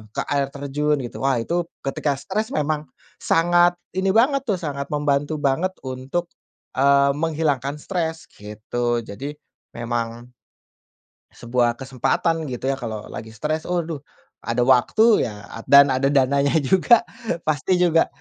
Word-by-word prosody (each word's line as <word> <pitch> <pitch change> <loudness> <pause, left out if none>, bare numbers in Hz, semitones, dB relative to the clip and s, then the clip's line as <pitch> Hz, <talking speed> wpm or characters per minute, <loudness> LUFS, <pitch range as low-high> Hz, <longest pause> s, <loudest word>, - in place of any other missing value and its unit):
ke - - 0
air 140 -1 +1
terjun 145 +2 0
gitu, 120 - -7
wah 135 -1 +1
itu 170 +9 -1 0.2
ketika 140 +1 -1
stres 205 +10 -3
memang 150 -1 -1 0.3
sangat 175 +1 +3 0.2
ini 190 +1 -1
banget 275 +4 +4
tuh, 205 - +2
sangat 140 -5 -4
membantu 145 +1 0
banget 155 +6 0
untuk, 130 +7 -4 0.5
eee, 140 0 +5
menghilangkan 150 -3 -1
stres 160 0 -3
gitu. 115 +3 -3
Jadi 140 +9 -7 0.4
memang 120 0 -4 1.0
sebuah 120 0 0
kesempatan 135 +6 -1
gitu 130 +1 -2
ya 135 - -4
kalau 110 -3 -5
lagi 110 0 -8
stres. 155 +6 -3
Aduh 170 -4 -2 0.4
ada 115 +1 -1
waktu 135 - +4
ya 105 -1 -9 0.2
dan 140 0 +7
ada 130 +1 +1
dananya 140 +1 +2
juga 190 - +4 0.4
pasti 155 +4 +1
juga, 175 -2 +3
140 Hz, 130 wpm, -22 LUFS, 130-165 Hz, 1.0 s, dan